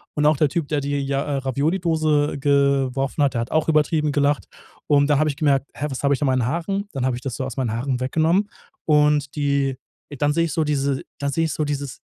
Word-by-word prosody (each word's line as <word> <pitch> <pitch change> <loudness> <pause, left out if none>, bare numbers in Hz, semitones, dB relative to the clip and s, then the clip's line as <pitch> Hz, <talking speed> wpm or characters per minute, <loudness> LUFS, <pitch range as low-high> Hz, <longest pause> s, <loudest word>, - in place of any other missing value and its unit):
Und 150 - +1
auch 155 -2 +3
der 150 -1 +3
Typ, 160 -1 -2
der 145 -1 -1
die, 145 +1 -2
ja, 140 +1 -1
Ravioli-Dose 150 +1 0
geworfen 140 0 +1
hat, 140 - +2
der 115 - +1
hat 115 - -5
auch 155 0 +1
übertrieben 155 0 +2
gelacht. 145 0 +1 0.4
Und 145 -1 +4
dann 145 - +4
habe 155 0 +2
ich 140 - -11
gemerkt, 140 -2 +1
hä, 150 - -3
was 135 0 -5
habe 140 - +3
ich - - -10
meinen 130 -4 +1
Haaren? 195 +8 -2
Dann 130 -2 -2
habe 125 - 0
ich 125 - -7
das 130 -4 -4
so 130 - -3
aus 130 -1 -7
meinen 125 -5 -1
Haaren 125 +2 -2
weggenommen. 160 +10 +1 0.4
Und 150 -2 +2
die 140 -2 0 0.4
dann 145 0 +2
sehe 165 +2 +2
ich 160 - -4
so 160 - +1
diese 140 -2 0 0.2
dann 140 0 -1
sehe 165 +3 +1
ich 155 - -2
so 155 - -1
dieses 140 -3 -4
145 Hz, 235 wpm, -22 LUFS, 135-150 Hz, 0.4 s, Und